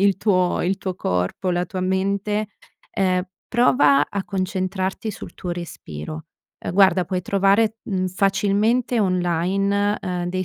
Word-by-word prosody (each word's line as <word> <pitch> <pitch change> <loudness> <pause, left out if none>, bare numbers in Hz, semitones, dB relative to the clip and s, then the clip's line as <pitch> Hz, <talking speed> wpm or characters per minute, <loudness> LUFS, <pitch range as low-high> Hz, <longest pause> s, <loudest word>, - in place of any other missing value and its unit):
il 200 -1 +4
tuo 185 -4 +1
il 190 +3 0
tuo 185 -2 -3
corpo, 90 - -1
la 175 0 0
tua 185 +1 -4
mente, 200 +3 0 0.5
uhm, 185 -1 +2 0.3
prova 250 +3 +4
a 200 -1 -3
concentrarti 190 +2 -2
sul 205 - -9
tuo 180 - -5
respiro. 155 - -7 0.4
Uhm, - - -2
guarda, 190 -2 +4
puoi 185 0 -2
trovare, 200 +4 +2
mhmm, 185 -2 -1
facilmente 205 +5 +1
online, 195 +3 +1
uhm, 180 -1 -3
dei 185 +1 -2
190 Hz, 140 wpm, -22 LUFS, 180-200 Hz, 0.5 s, il